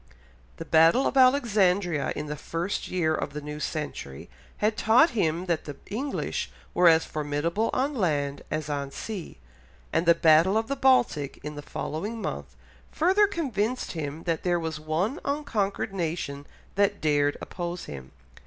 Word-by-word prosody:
The - - -6
Battle 165 +11 +5
of - - 0
Alexandria 200 - +3
in 150 - -4
the 150 0 -4
first 170 +5 -3
year 170 -4 +1
of 145 - -3
the 150 - -4
new 150 0 -7
century 145 - -5 0.3
had 215 +1 +1
taught 240 +11 +5
him 175 -6 0
that 170 -3 -1
the 145 - -6 0.2
English 270 +7 -2 0.2
were 180 0 +5
as 160 -1 +6
formidable 155 +8 -1
on 275 +3 0
land 145 - -1
as 155 -1 -3
on 140 -2 -3
sea, 195 - -7 0.6
and 165 +1 +1
the 170 - +7
Battle 165 +5 +5
of 225 +2 -1
the 275 - 0
Baltic 245 - +2
in 150 +1 -5
the 145 - -7
following 200 +9 -4
month, - - -5 0.4
further 380 +6 +4
convinced 255 - -2
him 155 -1 -5
that 165 -2 -1
there 175 -1 +1
was 160 -2 -4
one 170 - -1
unconquered 225 -10 -1
nation 155 -5 -3 0.3
that 200 +1 +1
dared 145 -1 +2
oppose 175 -1 -5
him. 65 -2 -9
170 Hz, 160 wpm, -27 LUFS, 150-220 Hz, 0.6 s, the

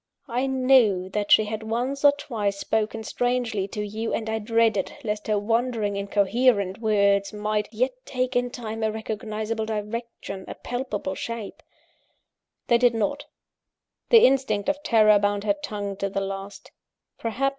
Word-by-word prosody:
I 250 +3 -1
knew 255 -8 +3
that 205 +1 -2
she 215 - +7
had 215 +1 -4
once 245 +6 -2
or 285 - +8
twice 220 -8 -3
spoken 220 +2 -1
strangely 240 -4 -1
to 210 +1 -4
you, 220 +2 -3
and 220 - -4
I 220 - -1
dreaded 220 -2 +1
lest 210 -2 -3
her 215 -1 +2
wandering, 225 -1 0
incoherent 200 0 +1
words 200 -3 +2
might 210 0 -2
yet 250 +4 0
take 255 0 -2
in 245 0 +1
time 225 -3 -6
a 220 0 +1
recognisable 220 0 -4
direction, 215 -2 -5
a - - -7
palpable 245 -6 -4
shape. 230 +1 -6 1.0
They 235 -1 +3
did 245 -1 +4
not; 285 +7 -1 0.8
the 460 -2 +8
instinct 260 -5 +2
of 290 0 -1
terror 215 -6 +5
bound 205 0 0
her 205 -1 +2
tongue 205 -2 -4
to 195 0 -2
the 195 - -2
last. 195 +1 -6
220 Hz, 150 wpm, -25 LUFS, 205-245 Hz, 1.0 s, or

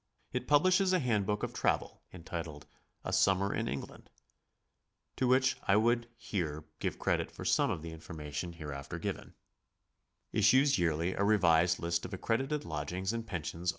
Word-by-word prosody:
It 125 0 -2
publishes 185 +6 +4
a 185 - +4
handbook 105 - 0
of - - -2
travel, - - -1
entitled 80 -4 -6 0.4
"A 95 - -3
Summer 95 +1 +3
in 115 - -1
England" 70 - -6 1.1
(to 130 - +1
which 130 +1 +3
I 100 - +5
would 115 +2 +2
here 80 -6 -3 0.2
give - - -2
credit - - 0
for - - -9
some - - +3
of 80 - -3
the 85 - -6
information 80 0 -6
hereafter 75 -4 -6
given); - - -5 1.0
issues 130 +6 +4
yearly 85 +1 +1
a - - -7
^revised 90 -4 +4
list 85 0 -1
of 95 - -5
accredited 135 +9 -1
lodgings 90 +7 -3
and 115 -1 -4
pen 85 -8 -4
sions 85 +4 -3
95 Hz, 155 wpm, -32 LUFS, 80-115 Hz, 1.1 s, I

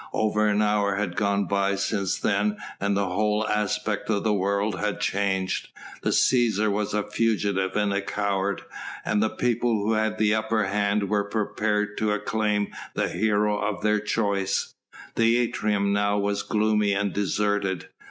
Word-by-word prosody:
Over 105 0 +1
an 105 0 +2
hour 105 -1 +1
had 100 -3 -2
gone 100 -1 +1
by 100 0 +1
since 100 -1 -1
then 105 0 +1 0.2
and 100 0 0
the 100 - +1
whole 105 +3 0
aspect 105 0 -1
of 100 -2 +1
the 110 - +2
world 100 0 0
had 105 -1 -2
changed. 95 -2 -1 0.3
The - - 0
Cæsar 110 -4 +3
was 105 0 -1
a 105 - +1
fugitive 100 -5 0
and 105 -1 +1
a 100 - 0
coward, 100 -1 -1 0.4
and 105 -1 +1
the 110 - +2
people 120 0 0
who 110 +2 +1
had 110 0 0
the 105 -1 +3
upper 110 0 +1
hand 100 +1 0
were 100 0 +1
prepared 105 -1 -1
to 105 -1 +1
acclaim 105 -1 0 0.3
the - - 0
hero 105 -1 +1
of 105 -1 -2
their 105 0 +3
choice. 100 -2 -1 0.4
The 115 +1 +3
atrium 105 -4 0
now 100 0 +1
was 100 0 0
gloomy 105 -1 +1
and 100 -2 -1
deserted. 100 -2 -1
105 Hz, 160 wpm, -25 LUFS, 100-105 Hz, 0.4 s, Cæsar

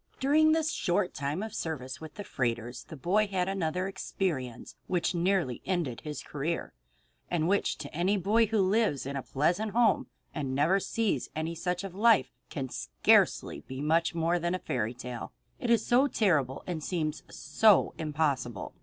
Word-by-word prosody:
During 305 +3 +4
this 320 0 +2
short 185 - 0
term 145 +8 -2
of 220 -1 -6
service 140 -9 -4
with 155 -1 -9
the 205 - -6
freighters 120 - -3
the 160 - -9
boy 200 +10 +2
had 185 -2 -1
another 185 -1 -1
experience 160 -10 -3
which 175 -1 0
nearly 175 -7 0
ended 170 -11 -2
his 150 -2 -6
career, 150 +4 -3 0.6
and 165 -2 +1
which 200 +2 +1
to 145 -1 -8
any 185 +5 +2
boy 215 +5 +3
who 215 -2 +2
lives 195 - +1
in 140 +1 -4
a 135 - -2
pleasant 175 +12 0
home 230 -3 +3 0.3
and 135 -4 -3
never 165 +8 +3
sees 205 - -1
any 160 +2 -2
such 180 +2 -2
life 205 +4 +3 0.2
can 135 -5 -4
scarcely - - +2
be 130 0 -6
much 165 +3 +1
more 170 +1 +1
than 175 +2 0
a - - -3
fairy 125 -9 -2
tale, 125 0 -7 0.3
it 245 - -3
is 230 -2 +3
so 255 +3 +4
terrible 155 - +1
and 165 -4 -4
seems 155 -3 -2
so 205 +8 +3
impossible. 145 - -1
170 Hz, 170 wpm, -29 LUFS, 140-200 Hz, 0.6 s, During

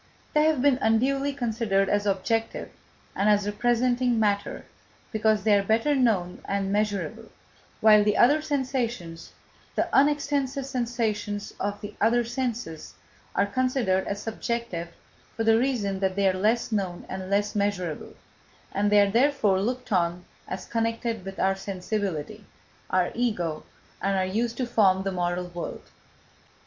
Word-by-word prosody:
They 300 -1 +4
have 310 -5 +2
been 275 -3 +4
unduly 270 +6 +2
considered 225 -7 0
as 205 +1 +1
objective 225 +4 -1 0.4
and 200 +2 +2
as 205 -1 +3
representing 240 +3 +1
matter 205 -2 0 0.5
because 220 -2 +2
they 215 -1 +4
are 200 - +5
better 225 +8 +2
known 215 -10 +1
and 195 -1 -1
measurable, 205 -1 -2 0.5
while 215 -1 +7
the 210 0 +1
other 290 +6 +5
sensations, 250 - -3 0.4
the - - +1
unextensive 280 -1 +2
sensations 230 -5 -2
of 205 +1 -2
the 205 0 -7
other 240 +2 +3
senses, 235 - -4 0.4
are 200 - +3
considered 235 -4 0
as 200 0 -4
subjective 225 -6 -3 0.5
for 225 - -1
the 225 0 +4
reasons 215 -7 -1
that 190 -1 0
they 200 -1 +2
are 190 - +3
less 215 +6 +1
known 190 -5 -2
and 190 0 -6
less 205 +1 +1
measurable: 200 -6 -2 0.6
and 205 +1 0
they 205 0 +7
are 200 -1 +2
therefore 230 -6 +3
looked 250 +4 -3
on 175 -1 0 0.2
as 185 - -5
connected 230 -2 -2
with 195 0 -7
our 195 0 +2
sensibility, 195 -1 -4 0.5
our 185 -1 +1
Ego, 180 -10 -1 0.4
and 195 0 +1
are 190 - +1
used 230 +5 -1
to 255 - 0
form 195 -5 +3
the 195 - -1
moral 180 0 -1
world. 175 -1 -7
210 Hz, 145 wpm, -26 LUFS, 195-240 Hz, 0.6 s, while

